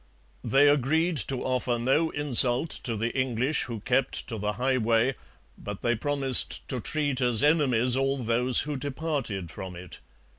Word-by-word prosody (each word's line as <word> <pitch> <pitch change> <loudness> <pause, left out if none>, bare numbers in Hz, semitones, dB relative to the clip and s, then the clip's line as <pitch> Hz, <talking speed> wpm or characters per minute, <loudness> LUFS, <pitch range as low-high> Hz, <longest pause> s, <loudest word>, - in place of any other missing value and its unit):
They 140 +2 +3
agreed 155 +4 +1
to 130 -2 -4
offer 125 -1 -1
no 135 +7 +1
insult 140 0 +3
to 115 - -2
the 115 +3 -3
English 130 +2 0
who 115 -4 -7
kept 130 +3 0
to 115 -3 -5
the 105 +1 -2
highway, 125 -1 +1 0.5
but 105 -1 -8
they 120 - +1
promised 135 +1 +1
to 130 - -3
treat 145 0 -2
as 120 0 +2
enemies 130 -6 +3
all 135 +1 0
those 125 +1 +1
who 145 -1 -4
departed 135 - -4
from 95 -1 -8
it. 85 -1 -10
130 Hz, 155 wpm, -26 LUFS, 115-145 Hz, 0.5 s, They